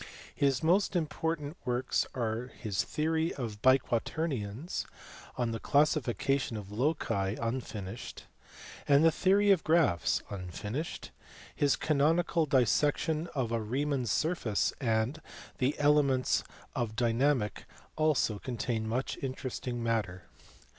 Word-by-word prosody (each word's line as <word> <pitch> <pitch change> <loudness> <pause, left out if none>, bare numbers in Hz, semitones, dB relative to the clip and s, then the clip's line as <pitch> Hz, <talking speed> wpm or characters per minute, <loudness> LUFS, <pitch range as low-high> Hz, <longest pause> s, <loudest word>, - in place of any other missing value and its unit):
His 135 -1 +1
most 185 +4 +3
important 160 -1 -2
works 125 0 0
are 115 0 -2
his 105 -5 -1
Theory 160 +2 -1
of 110 -5 -5
Biquaternions, 130 - 0 0.5
On 120 -2 0
the 115 - -3
Classification 140 -3 +1
of 100 -1 -8
Loci 105 -6 0
(unfinished), 115 -3 -5 0.6
and 145 +2 +5
The 165 - +6
Theory 200 +4 +3
of 185 -5 +3
Graphs 155 - +2
(unfinished): 105 - -5 0.4
his 145 -2 +3
Canonical 160 +2 +2
Dissection 150 +4 +2
of 125 -5 -1
a 115 -1 0
Riemann 135 +5 -1
s 110 - -1
Surface, 155 - 0
and 115 +5 0 0.4
the 130 +3 +1
Elements 145 -3 +3 0.3
of 110 -3 -2
Dynamic 120 -1 +1 0.3
also 150 -9 +1
contain 115 -2 -3
much 125 +4 -2
interesting 130 -2 -4
matter. 105 -6 -1
130 Hz, 115 wpm, -31 LUFS, 115-155 Hz, 0.6 s, The